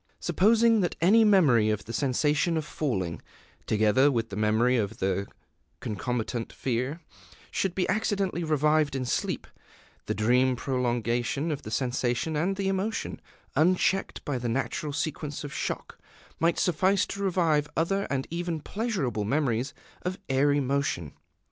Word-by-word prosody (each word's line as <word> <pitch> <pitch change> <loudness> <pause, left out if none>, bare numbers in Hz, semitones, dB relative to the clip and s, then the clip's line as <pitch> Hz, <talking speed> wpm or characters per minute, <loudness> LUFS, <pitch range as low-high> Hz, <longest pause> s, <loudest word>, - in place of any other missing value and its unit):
Supposing 225 +3 +4
that 175 - -1
any 210 +7 +5
memory 150 - +5
of 105 -1 -1
the 115 - -7
sensation 150 +5 +1
of 155 - -2
falling, 95 - -2 0.5
together 110 +6 +4
with 115 -3 -1
the 100 - -6
memory 110 +4 +2
of 105 -5 -1
the 95 +1 -1 0.5
concomitant 115 +2 -3
fear, 130 +6 -2 0.5
should 190 -3 -1
be 185 - 0
accidentally 195 -3 0
revived 150 -1 +2
in 130 -1 -2
sleep, - - -1 0.6
the - - -1
dream 125 +5 +3
prolongation 120 +3 -1
of 145 - -3
the - - -8
sensation 125 +5 -1
and 175 +6 0
the 195 0 -2
emotion 195 +3 -2 0.3
unchecked 185 +3 +1
by 135 -4 -1
the 120 -1 -2
natural 140 +6 -2
sequence 145 0 -3
of 145 - -6
shock - - -4 0.4
might 170 +1 +2
suffice 185 +3 +2
to 200 - -6
revive 165 -6 +1
other 195 +5 +1
and 135 -1 -1
even 170 -1 -2
pleasurable 185 - -2
memories 130 +1 0 0.3
of 185 +1 -3
airy 145 +2 +3
motion. 135 - -1
145 Hz, 140 wpm, -27 LUFS, 120-175 Hz, 0.6 s, any